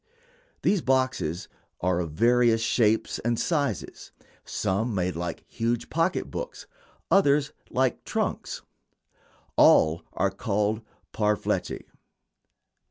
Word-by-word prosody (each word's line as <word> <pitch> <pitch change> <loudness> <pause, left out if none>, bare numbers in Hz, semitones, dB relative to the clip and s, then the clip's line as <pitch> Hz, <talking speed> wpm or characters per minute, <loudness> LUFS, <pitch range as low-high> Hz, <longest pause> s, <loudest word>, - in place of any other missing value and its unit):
These 200 -4 +3
boxes 130 - 0 0.3
are 90 -1 +1
of 85 -2 -2
various 120 +4 +4
shapes 110 -1 +2
and 120 0 0
sizes 145 - -2 0.3
some 110 +4 -1
made 90 -2 0
like 85 0 -4
huge 115 0 -2
pocket 165 +3 0
books, - - -6 0.5
others 150 -5 +4 0.2
like 130 -1 0
trunks. - - -3 0.9
All 80 +2 +6
are - - +1
called 105 +2 -1 0.3
"parfleche." 105 -1 0
115 Hz, 100 wpm, -26 LUFS, 95-130 Hz, 0.9 s, All